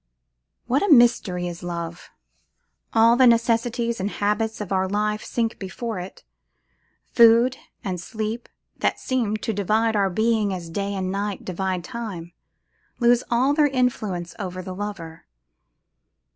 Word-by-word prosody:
What 255 +4 +1
a 405 - +1
mystery 230 -9 +4
is 175 -1 -7
Love! 170 -1 -6 0.8
All 230 +1 +5
the 255 0 +6
necessities 235 0 +2
and 195 +2 -1
habits 210 +2 -1
of 210 -3 -6
our 190 -1 +1
life 210 +1 -1
sink 230 -1 -2
before 210 +2 -5
it. 180 +2 -9 0.9
Food 235 +2 +6 0.3
and 185 -5 -3
sleep, 220 +3 -5 0.3
that - - 0
seem 235 -5 -1
to 225 - -3
divide 215 +3 +1
our 200 -2 +2
being 215 0 +1
as 170 -2 -8
day 200 +3 -2
and 185 -1 -2
night 200 0 -3
divide 185 -1 -2
Time, 200 -9 -7 0.7
lose 240 0 +4
all 255 +4 +3
their 295 0 +4
influence 220 -10 -1
over 185 -2 -5
the 185 - -6
lover. 185 -5 -7
210 Hz, 140 wpm, -23 LUFS, 185-235 Hz, 0.9 s, the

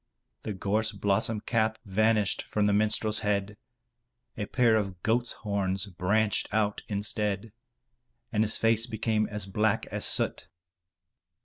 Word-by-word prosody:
The 105 - -4
gorse 105 +3 0
blossom 100 +2 +1
cap 110 -2 0
vanished 105 0 +1
from 105 -1 0
the 105 - +2
minstrel's 110 +1 +1
head, 105 -1 -1 0.8
a 105 -2 -4
pair 120 -3 +3
of 95 -4 -2
goat's 120 +2 +1
horns 100 -2 -2
branched 100 +3 0
out 105 -1 0
instead, 105 0 -2 0.8
and 110 -1 +2
his 110 - 0
face 115 +1 +2
became 110 -2 0
as 105 -2 -2
black 105 +2 0
as - - -2
soot. - - +3
105 Hz, 130 wpm, -28 LUFS, 100-110 Hz, 0.8 s, pair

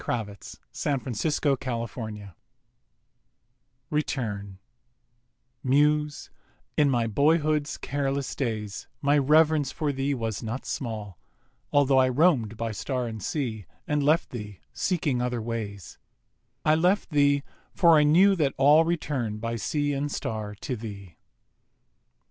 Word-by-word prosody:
1882. 125 +5 -3
APOLOGUES 115 -6 -4 1.6
RETURN 110 -10 -2 1.1
Muse, 150 +2 +1 0.4
in 145 -2 +4
my 120 -3 +1
boyhood's 150 +5 +1
careless 140 -1 -2
days 110 -6 -3
My 145 +1 +2
rev'rence 150 0 +4
for 150 -2 -1
thee 135 +1 -1
was 115 -4 -3
not 115 +3 -5
small, 105 -7 -5 0.5
Altho' 140 -2 +4
I 130 0 +4
roam'd 125 - +2
by 115 0 -2
Star 125 +4 -3
and 110 -2 -6
Sea 110 - -3 0.2
And 150 0 +1
left 155 +4 +2
thee, 105 -5 -7
seeking 150 -9 0
other 125 -1 -1
ways— 110 -4 -5 0.7
I 155 - +5
left 180 +5 +2
thee, 145 -1 +3 0.3
for 170 -3 +5
I - - +5
knew 180 +7 +5
that 145 -5 +1
all 145 +4 +6
Return 145 -10 -2
by 115 +2 -3
Sea 145 +6 -1
and 145 +1 -2
Star 105 -4 -4
to 125 +5 -4
thee. 100 -7 -9
135 Hz, 120 wpm, -26 LUFS, 110-150 Hz, 1.6 s, all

